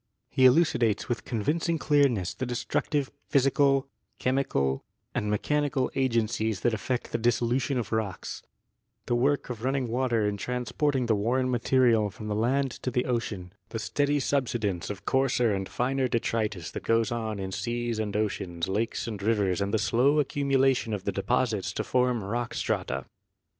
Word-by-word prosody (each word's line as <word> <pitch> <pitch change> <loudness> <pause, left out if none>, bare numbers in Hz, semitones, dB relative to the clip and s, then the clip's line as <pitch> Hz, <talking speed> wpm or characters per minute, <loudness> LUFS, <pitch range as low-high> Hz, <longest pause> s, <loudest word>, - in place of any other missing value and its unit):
He 130 - +4
elucidates 125 -6 +3
with 115 -4 -3
convinc 150 +10 -1
ing 165 - +2
clearness 140 - +2
the 130 - -4
destructive 135 +3 -1 0.2
physical, 135 0 +3 0.3
chemical 70 - 0 0.3
and 105 - -1
me 105 - +2
chanical 145 -2 0
agencies 115 -5 0
that 120 - +2
effect 120 +4 -2
the - - -1
dissolution 120 +3 +1
of 120 - -3
rocks, 110 -4 -3 0.6
the - - -1
work 135 +2 +1
of 115 -2 -7
running 135 -1 0
water 120 -3 +1
in 105 0 -2
transporting 125 +4 -1
the 115 - +2
worn 125 +5 +1
material 120 -3 +3
from 105 +1 -8
the 105 - -1
land 130 +5 +1
to - - -1
the 125 0 0
ocean, 105 -7 -3 0.2
the 115 - -4
steady 145 +6 0
subsidence 120 -10 -1
of 100 -1 -6
coarser 125 -4 +2
and 95 -1 -3
finer 130 +6 0
detritus 110 -6 -1
that - - -5
goes 115 0 +1
on 110 -3 -2
in 95 -1 -4
seas 120 +2 -2
and 105 -1 -1
oceans, 95 -5 -2
lakes 110 +4 -1
and 105 -3 -5
rivers 100 -3 +1
and 100 0 -1
the 110 - +2
slow 135 +7 +3
accumulation 135 -4 +2
of 95 - -7
the - - -1
deposits 110 -2 0
to - - -3
form 125 -3 +1
rock 120 +4 -3
strata. - - -2
120 Hz, 165 wpm, -28 LUFS, 105-130 Hz, 0.6 s, He